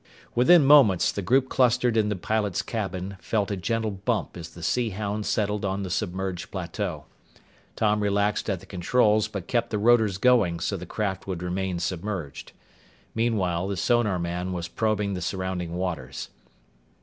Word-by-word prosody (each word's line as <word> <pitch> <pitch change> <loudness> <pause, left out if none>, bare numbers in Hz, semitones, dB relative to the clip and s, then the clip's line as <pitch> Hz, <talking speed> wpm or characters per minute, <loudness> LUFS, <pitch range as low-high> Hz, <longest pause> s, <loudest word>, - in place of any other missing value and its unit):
Within 140 +6 +6
moments, 135 -11 +6
the 100 - -4
group 130 +7 +2
clustered 125 -2 +2
in 110 -2 +2
the 105 - -1
pilot's 100 0 -1
cabin 95 -3 -4
felt 105 +2 -1
a - - 0
gentle 110 +3 -1
bump 100 +3 -2
as 85 -1 -7
the 85 - -12
Sea 120 +7 +1
Hound 105 +1 -3
settled 105 -1 0
on 100 0 -1
the 95 - -5
submerged 95 0 -3
plateau. - - -4 0.7
Tom 105 -1 +1
relaxed 100 +1 0
at 95 -4 -2
the - - -13
controls 105 +3 +2
but 100 -4 -6
kept 115 0 0
the 105 - -1
rotors 110 -3 +3
going 100 -7 +3
so 100 - -1
the 90 -2 -7
craft 95 -3 -3
would 90 -2 -4
remain 90 0 -2
submerged. 85 -3 -4 0.6
Meanwhile, 95 -6 0
the 100 -1 -3
sonarman 90 -5 0
was 85 -1 -3
probing 105 +1 -1
the 90 - -4
surrounding 90 -2 -3
waters. 80 -8 -4
100 Hz, 160 wpm, -26 LUFS, 90-110 Hz, 0.7 s, Within